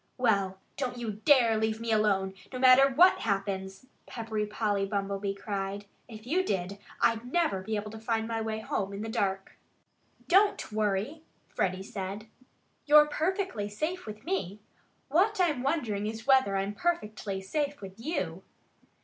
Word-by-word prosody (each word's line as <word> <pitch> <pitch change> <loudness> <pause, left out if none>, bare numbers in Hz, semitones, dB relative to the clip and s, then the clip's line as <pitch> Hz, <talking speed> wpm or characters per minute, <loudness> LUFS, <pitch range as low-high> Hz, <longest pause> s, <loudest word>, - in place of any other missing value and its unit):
"Well, 200 -6 +1 0.2
don't 250 -3 -3
you 235 -2 -3
dare 235 +2 +4
to 220 - 0
leave 220 0 0
me 230 0 -3
alone, 200 -3 +2 0.2
no 255 - -5
matter 260 +2 +7
what 345 +8 +5
happens!" 195 0 -3 0.2
Peppery 220 -2 -3
Polly 210 -2 0
Bumblebee 195 0 -2
cried. 200 0 -4 0.2
"If 220 -2 -11
you 350 +9 +1
did, 195 - -2 0.2
I'd 230 +2 +1
never 320 - +1
be 215 +3 -3
able 210 0 -4
to 220 - -8
find 225 0 -1
my 225 -1 -2
way 220 0 -3
home 200 -2 -2
in 200 +2 -5
the 225 - -4
dark." 195 -3 -2 0.7
"Don't 400 - +3
worry!" 215 +8 -1 0.3
Freddie 185 0 -1
said. 195 +1 -6 0.6
"You're 300 0 +8
perfectly 315 - -2
safe 310 - -3
with 215 0 -8
me.... 195 +1 -2 0.5
What 380 +9 +2
I'm 315 -8 +2
wondering 240 -8 -1
is 225 +1 -6
whether 260 -7 +4
I'm 195 +1 -2
perfectly 210 - -2
safe 285 +9 -2
with 195 +1 -10
you." 310 +9 -3
220 Hz, 160 wpm, -29 LUFS, 200-265 Hz, 0.7 s, You're